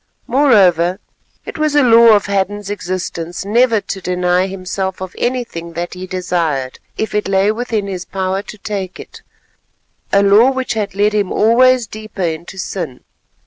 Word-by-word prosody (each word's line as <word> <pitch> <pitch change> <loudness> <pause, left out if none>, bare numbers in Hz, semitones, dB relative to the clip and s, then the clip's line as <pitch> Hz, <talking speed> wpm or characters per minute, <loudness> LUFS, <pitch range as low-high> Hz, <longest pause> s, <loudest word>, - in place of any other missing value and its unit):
Moreover, 190 - +3 0.5
it - - -7
was 305 -1 +1
a 290 - +5
law 230 -2 +7
of 205 - +1
Hadden's 200 0 -2
existence 180 -2 -4
never 230 +2 +3
to 195 0 -6
deny 180 +1 +1
himself 190 0 -4
of 185 -1 -7
anything 230 -10 -3
that 175 +1 -4
he 185 0 -7
desired 170 -8 -2 0.2
if 220 - -3
it 210 0 0
lay 195 +1 +2
within 220 -2 -2
his 185 -2 -5
power 190 +1 -2
to 215 - -11
take 195 -3 -5
it—a 200 0 -6
law 205 +6 +6
which 260 -1 -2
had 205 -3 -3
led 205 +1 +2
him 205 -3 0
always 250 +2 +4
deeper 215 -3 -7
into 170 +3 -4
sin. 165 -9 -5
195 Hz, 155 wpm, -16 LUFS, 180-220 Hz, 0.5 s, law